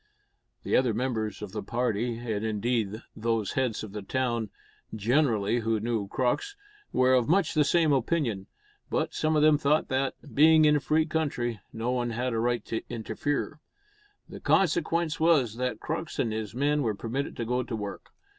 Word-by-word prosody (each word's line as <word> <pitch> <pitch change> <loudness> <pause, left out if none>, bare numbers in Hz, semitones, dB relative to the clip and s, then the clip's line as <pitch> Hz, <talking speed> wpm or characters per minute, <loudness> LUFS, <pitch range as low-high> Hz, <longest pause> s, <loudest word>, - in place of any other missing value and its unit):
The - - 0
other 125 -4 +3
members 110 -5 -2
of 100 - -6
the 105 +1 -4
party, 115 +1 -1
and 110 -3 -3
indeed 110 0 -1
those 115 -2 -1
heads 125 -5 -1
of 105 - -7
the 105 0 -5
town 120 0 -1 0.5
generally 115 -1 +2
who 115 -1 0
knew 110 -2 -2
Crux, 130 - -1 0.4
were 130 0 +3
of 125 -1 +3
much 180 -1 +3
the 150 - +4
same 155 +1 +3
opinion, 125 - 0 0.4
but - - -1
some 155 0 +1
of 150 - +3
them 155 -1 +5
thought 150 +1 +2
that, 135 0 0 0.2
being 155 +1 +6
in 150 0 +5
a - - 0
free 155 +2 +2
country, 140 -8 -2
no 115 +2 -2
one 120 -1 0
had 120 +2 -2
a 115 - 0
right 120 -1 0
to 115 - -3
interfere. 140 +7 -3 0.7
The - - -9
consequence 170 -2 +1
was 145 -9 +3
that 125 -3 -2
Crux 160 0 -4
and 115 -3 0
his 110 0 -4
men 145 +3 +1
were 110 -6 0
permitted 120 +7 -4
to 115 - -2
go 125 +2 0
to 115 - -4
work. 105 -2 -6
120 Hz, 180 wpm, -28 LUFS, 110-150 Hz, 0.7 s, being